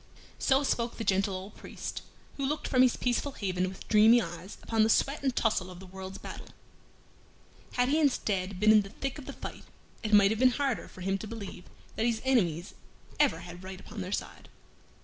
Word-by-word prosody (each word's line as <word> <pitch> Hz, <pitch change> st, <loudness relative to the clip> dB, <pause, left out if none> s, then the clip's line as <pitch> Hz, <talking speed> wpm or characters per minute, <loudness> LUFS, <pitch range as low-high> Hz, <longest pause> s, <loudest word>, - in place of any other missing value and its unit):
So 270 Hz, +1 st, +3 dB
spoke 235 Hz, -3 st, -1 dB
the 230 Hz, -, -3 dB
gentle 195 Hz, -1 st, +1 dB
old 190 Hz, +3 st, -7 dB
priest, -, -, -6 dB, 0.3 s
who 275 Hz, -, -4 dB
looked 300 Hz, +2 st, -2 dB
from 255 Hz, -, +4 dB
his 255 Hz, -2 st, +4 dB
peaceful 250 Hz, +3 st, 0 dB
haven 185 Hz, -4 st, -1 dB
with 190 Hz, -, -11 dB
dreamy 220 Hz, +2 st, +7 dB
eyes 175 Hz, -1 st, -6 dB
upon 225 Hz, -1 st, +1 dB
the 220 Hz, -, +4 dB
sweat 275 Hz, +5 st, +2 dB
and 265 Hz, -3 st, 0 dB
tussle 210 Hz, -5 st, +1 dB
of 180 Hz, -1 st, -10 dB
the 190 Hz, -, -10 dB
world's 190 Hz, +1 st, -8 dB
battle. -, -, -9 dB, 1.3 s
Had 245 Hz, 0 st, +2 dB
he 305 Hz, +3 st, +3 dB
instead 200 Hz, -10 st, 0 dB
been 215 Hz, +2 st, +6 dB
in 215 Hz, -1 st, +7 dB
the 195 Hz, -, -8 dB
thick 275 Hz, +7 st, -4 dB
of 275 Hz, -, -11 dB
the 275 Hz, -, -5 dB
fight, -, -, -8 dB, 0.4 s
it 220 Hz, -, -3 dB
might 200 Hz, -1 st, +6 dB
have 220 Hz, -, -1 dB
been 255 Hz, 0 st, +6 dB
harder 275 Hz, -5 st, -1 dB
for 185 Hz, -, -13 dB
him 195 Hz, +1 st, 0 dB
to 215 Hz, -, -6 dB
believe 200 Hz, -5 st, -8 dB, 0.3 s
that 225 Hz, -, +1 dB
his 230 Hz, -2 st, 0 dB
enemies 180 Hz, -10 st, +1 dB, 0.5 s
ever 275 Hz, -, +3 dB
had 175 Hz, +1 st, -10 dB
right 190 Hz, 0 st, -7 dB
upon 205 Hz, +1 st, -8 dB
their 185 Hz, +1 st, -5 dB
side. -, -, -5 dB
215 Hz, 210 wpm, -30 LUFS, 190-250 Hz, 1.3 s, dreamy